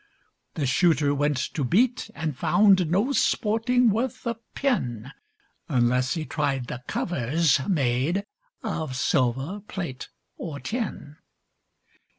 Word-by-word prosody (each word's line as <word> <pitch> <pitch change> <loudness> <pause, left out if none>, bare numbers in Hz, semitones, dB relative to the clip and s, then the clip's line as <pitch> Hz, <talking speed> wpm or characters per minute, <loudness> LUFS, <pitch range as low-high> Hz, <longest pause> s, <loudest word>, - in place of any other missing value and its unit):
The 145 - -1
Shooter 145 +1 +3
went 145 0 +1 0.2
to 150 - -1
beat, 230 - +2
and 155 -4 -3
found 185 +4 +4
No 205 - +2
sporting 235 -1 +2
worth 235 +5 -2
a 235 - 0 0.2
pin, 135 - -1 0.6
Unless 125 +1 +2
he 160 -2 -3
tried 135 -4 -1
the 120 +1 -6
covers 155 -1 +1
made 150 +4 +1 0.4
Of 160 - -3
silver, 135 - 0
plate, 165 -10 -5 0.3
or 150 -5 -6
tin. 210 - -4
160 Hz, 115 wpm, -25 LUFS, 130-205 Hz, 0.6 s, found